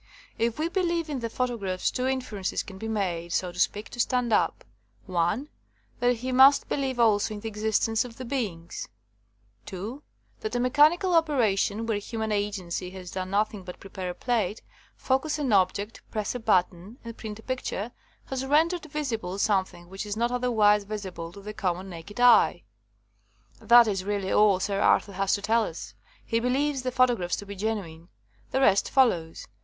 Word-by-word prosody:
If 230 Hz, 0 st, 0 dB
he 315 Hz, +2 st, 0 dB
believes 340 Hz, -3 st, -1 dB
in 280 Hz, -3 st, -2 dB
the 230 Hz, -1 st, -3 dB
photographs 225 Hz, -7 st, -1 dB
two 255 Hz, +1 st, -1 dB
inferences 250 Hz, -8 st, -2 dB
can 190 Hz, -1 st, -11 dB
be 220 Hz, -, -5 dB
made, 180 Hz, -6 st, -2 dB
so 180 Hz, -1 st, 0 dB
to 175 Hz, -, -10 dB
speak, 205 Hz, +3 st, 0 dB
to 245 Hz, -, -10 dB
stand 245 Hz, -1 st, +1 dB
up: -, -, +1 dB, 0.4 s
one, 185 Hz, -, 0 dB, 0.5 s
that 245 Hz, 0 st, +3 dB
he 255 Hz, +3 st, -4 dB
must 265 Hz, +2 st, +6 dB
believe 265 Hz, -3 st, -2 dB
also 215 Hz, -2 st, +3 dB
in 205 Hz, -, -8 dB
the 225 Hz, -, -5 dB
existence 220 Hz, +1 st, +1 dB
of 240 Hz, -2 st, -11 dB
the 255 Hz, -, -6 dB
beings; 210 Hz, -11 st, -4 dB, 0.8 s
two, 210 Hz, +9 st, -7 dB, 0.4 s
that 215 Hz, +2 st, -4 dB
a -, -, +1 dB
mechanical 300 Hz, +9 st, +4 dB
opera 290 Hz, -, +3 dB
tion, 205 Hz, +3 st, -1 dB
where 220 Hz, -3 st, 0 dB
human 220 Hz, +1 st, -4 dB
agency 195 Hz, -4 st, -2 dB
has 185 Hz, -1 st, -9 dB
done 185 Hz, 0 st, -4 dB
nothing 205 Hz, 0 st, 0 dB
but 180 Hz, -1 st, -9 dB
prepare 190 Hz, -2 st, -6 dB
a 180 Hz, -, -5 dB
plate, 220 Hz, -4 st, -1 dB, 0.3 s
focus 270 Hz, +4 st, 0 dB
an 275 Hz, -7 st, 0 dB
object, 200 Hz, +3 st, +1 dB
press 215 Hz, -2 st, -2 dB
a 250 Hz, -, -4 dB
button, 190 Hz, 0 st, 0 dB
and 230 Hz, -1 st, -8 dB
print 215 Hz, -3 st, -7 dB
a 220 Hz, -, -14 dB
picture, 250 Hz, -3 st, -3 dB, 0.3 s
has 265 Hz, -1 st, -3 dB
rendered 320 Hz, +5 st, +2 dB
visible 230 Hz, -11 st, -3 dB
something 190 Hz, -4 st, 0 dB
which 195 Hz, +3 st, -6 dB
is 205 Hz, +1 st, -3 dB
not 235 Hz, +1 st, +1 dB
otherwise 220 Hz, -5 st, +3 dB
visible 190 Hz, -5 st, -6 dB
to 200 Hz, -, -12 dB
the 210 Hz, +2 st, -7 dB
common 190 Hz, -2 st, -2 dB
naked 175 Hz, +6 st, -9 dB
eye. 235 Hz, -7 st, +5 dB, 1.0 s
That 240 Hz, -1 st, +7 dB
is 195 Hz, -3 st, -1 dB
really 200 Hz, -1 st, -2 dB
all 210 Hz, -3 st, +4 dB
Sir 195 Hz, +1 st, -1 dB
Arthur 200 Hz, -, +3 dB
has 195 Hz, +1 st, +1 dB
to 200 Hz, -, -6 dB
tell 225 Hz, +2 st, +3 dB
us. 110 Hz, -, -7 dB, 0.3 s
He 230 Hz, -, 0 dB
be 245 Hz, +2 st, -1 dB
lieves 280 Hz, +1 st, 0 dB
the 255 Hz, 0 st, -2 dB
photographs 245 Hz, -9 st, +2 dB
to 205 Hz, -, -7 dB
be 200 Hz, 0 st, -8 dB
genuine. 190 Hz, -6 st, -4 dB, 0.4 s
The 265 Hz, -, 0 dB
rest 200 Hz, -6 st, +4 dB
follows. 175 Hz, -12 st, +2 dB
215 Hz, 180 wpm, -27 LUFS, 195-250 Hz, 1.0 s, That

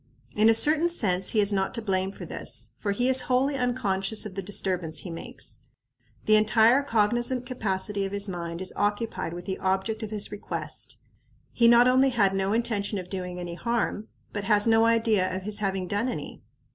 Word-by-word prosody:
In 215 Hz, +1 st, +4 dB
a 225 Hz, -, +6 dB
certain 310 Hz, +7 st, +3 dB
sense 190 Hz, -, +1 dB
he 215 Hz, -, +2 dB
is 205 Hz, 0 st, +2 dB
not 190 Hz, +3 st, -1 dB
to -, -, -2 dB
blame 190 Hz, -2 st, -1 dB
for -, -, -9 dB
this, -, -, -2 dB
for 205 Hz, -, -2 dB
he 245 Hz, +5 st, +1 dB
is 260 Hz, 0 st, +6 dB
wholly 265 Hz, +3 st, +2 dB
unconscious 220 Hz, -5 st, 0 dB
of 210 Hz, -, -7 dB
the 195 Hz, -, -4 dB
disturbance 180 Hz, -5 st, -1 dB
he 175 Hz, -, -7 dB
makes. 165 Hz, -, -5 dB, 0.7 s
The 215 Hz, 0 st, +5 dB
entire 225 Hz, +4 st, +4 dB
cognizant 240 Hz, +1 st, 0 dB
capacity 205 Hz, -5 st, -2 dB
of 195 Hz, -, -3 dB
his 200 Hz, 0 st, +1 dB
mind 170 Hz, -2 st, -5 dB
is 185 Hz, -, 0 dB
occupied 205 Hz, -2 st, -2 dB
with 175 Hz, 0 st, -8 dB
the 190 Hz, -, -4 dB
object 190 Hz, +4 st, -1 dB
of 220 Hz, -, -5 dB
his 210 Hz, -2 st, -2 dB
request. 205 Hz, -, -6 dB, 0.5 s
He 235 Hz, -, +3 dB
not 235 Hz, +1 st, +6 dB
only 260 Hz, +2 st, +4 dB
had 205 Hz, -6 st, +2 dB
no 195 Hz, 0 st, -1 dB
intention 215 Hz, -3 st, -1 dB
of 180 Hz, -1 st, -7 dB
doing 180 Hz, -2 st, -5 dB
any 175 Hz, -1 st, -6 dB
harm, 230 Hz, +1 st, -2 dB, 0.3 s
but 205 Hz, -1 st, -4 dB
has 210 Hz, -1 st, +3 dB
no 225 Hz, 0 st, +4 dB
idea 225 Hz, -5 st, +2 dB
of 190 Hz, -, -7 dB
his 210 Hz, +1 st, 0 dB
having 190 Hz, -2 st, -2 dB
done 205 Hz, +7 st, -1 dB
any. -, -, -7 dB
210 Hz, 195 wpm, -26 LUFS, 190-235 Hz, 0.7 s, a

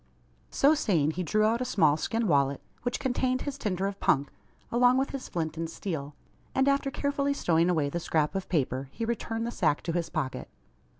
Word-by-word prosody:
So 280 Hz, +3 st, +4 dB
saying, 170 Hz, -, +2 dB
he 180 Hz, -, -4 dB
drew 215 Hz, +5 st, +1 dB
out 225 Hz, +3 st, +2 dB
a -, -, +2 dB
small 155 Hz, -11 st, +3 dB
skin 225 Hz, +8 st, -1 dB
wallet, 140 Hz, -3 st, +2 dB, 0.2 s
which 245 Hz, -, -2 dB
contained 255 Hz, -1 st, 0 dB
his 285 Hz, -1 st, -5 dB
tinder 190 Hz, -4 st, -1 dB
of 200 Hz, 0 st, -3 dB
"punk," 140 Hz, -1 st, +2 dB, 0.4 s
along 245 Hz, +2 st, +4 dB
with 270 Hz, +1 st, 0 dB
his 275 Hz, -2 st, -6 dB
flint 160 Hz, -2 st, -3 dB
and 165 Hz, 0 st, -3 dB
steel; 150 Hz, -5 st, -5 dB, 0.4 s
and, 265 Hz, +1 st, +3 dB
after 275 Hz, 0 st, +2 dB
carefully 280 Hz, 0 st, -1 dB
stowing 170 Hz, -6 st, +2 dB
away 155 Hz, -5 st, +2 dB
the 170 Hz, +5 st, -2 dB
scrap 155 Hz, -2 st, 0 dB
of 195 Hz, -1 st, -4 dB
paper, 135 Hz, -4 st, -1 dB
he 230 Hz, -, -4 dB
returned 230 Hz, 0 st, -2 dB
the 235 Hz, -, -3 dB
sack 150 Hz, -9 st, +1 dB
to 170 Hz, -, -2 dB
his 170 Hz, 0 st, -1 dB
pocket. 130 Hz, -, -3 dB
190 Hz, 200 wpm, -28 LUFS, 155-250 Hz, 0.4 s, So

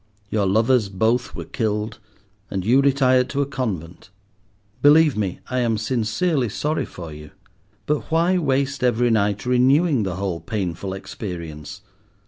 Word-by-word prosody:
Your 105 Hz, -3 st, +1 dB
lovers 110 Hz, +2 st, +2 dB
both 110 Hz, +5 st, 0 dB
were -, -, -6 dB
killed, 110 Hz, -2 st, -2 dB, 0.5 s
and 95 Hz, -2 st, -3 dB
you 125 Hz, +5 st, +5 dB
retired 130 Hz, -2 st, +3 dB
to 140 Hz, +1 st, 0 dB
a -, -, -3 dB
convent. 100 Hz, -, -5 dB, 0.7 s
Believe 150 Hz, 0 st, +6 dB
me, 100 Hz, -4 st, -3 dB
I 130 Hz, -, -1 dB
am 115 Hz, -3 st, +1 dB
sincerely 120 Hz, +5 st, 0 dB
sorry 150 Hz, +9 st, -1 dB
for 85 Hz, -3 st, -9 dB
you, 75 Hz, 0 st, -11 dB, 0.6 s
but 150 Hz, 0 st, -1 dB
why 170 Hz, +3 st, +2 dB
waste 140 Hz, -3 st, 0 dB
every 120 Hz, -1 st, +2 dB
night 105 Hz, -1 st, +1 dB
renewing 130 Hz, +3 st, +3 dB
the 95 Hz, -4 st, -2 dB
whole 95 Hz, -3 st, -3 dB
painful 95 Hz, -2 st, -4 dB
experience? 85 Hz, -3 st, -7 dB
115 Hz, 140 wpm, -22 LUFS, 95-135 Hz, 0.7 s, Believe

